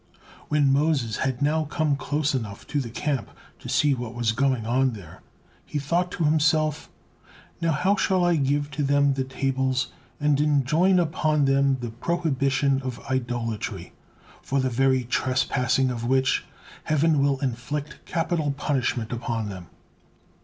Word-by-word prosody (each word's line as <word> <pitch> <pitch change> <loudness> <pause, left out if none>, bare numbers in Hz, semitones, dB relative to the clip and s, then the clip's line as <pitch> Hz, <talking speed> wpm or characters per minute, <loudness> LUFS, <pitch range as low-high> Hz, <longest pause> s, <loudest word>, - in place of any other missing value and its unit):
When 145 -2 +3
Moses 140 -6 +1
had 130 +1 -1
now 155 +2 +1
come 150 0 0
close 145 +1 -1
enough 110 -5 -4
to 145 - +2
the 120 - -6
camp 135 +3 -2 0.3
to - - -9
see 145 -1 +3
what 120 -2 -5
was 120 -2 +1
going 130 -1 0
on 130 +2 +2
there, 95 -7 -11 0.4
he - - -5
thought 170 +6 0
to 170 - -2
himself: 155 0 +2 0.7
"How 165 - 0 0.2
now 200 +2 +5
shall 185 -2 +2
I 175 -1 +3
give 145 +1 0
to 150 +1 -3
them 140 0 +3
the 135 0 -1
tables 130 -1 -1 0.3
and 145 -1 +2
enjoin 150 +6 +3
upon 155 -3 +1
them 135 0 +3
the 120 -2 -4
prohibition 140 -1 0
of 130 -2 -5
idolatry, 120 -4 -3 0.5
for 140 - -1
the 130 -1 0
very 130 +1 +2
trespassing 125 +1 +1
of 115 -2 -4
which, 130 +2 +1 0.4
Heaven 155 -1 +2
will 140 -1 +2
inflict 140 +4 -4
capital 165 -4 0
punishment 125 -6 -1
upon 115 -2 -3
them?" 90 -3 -8
135 Hz, 150 wpm, -25 LUFS, 125-150 Hz, 0.7 s, now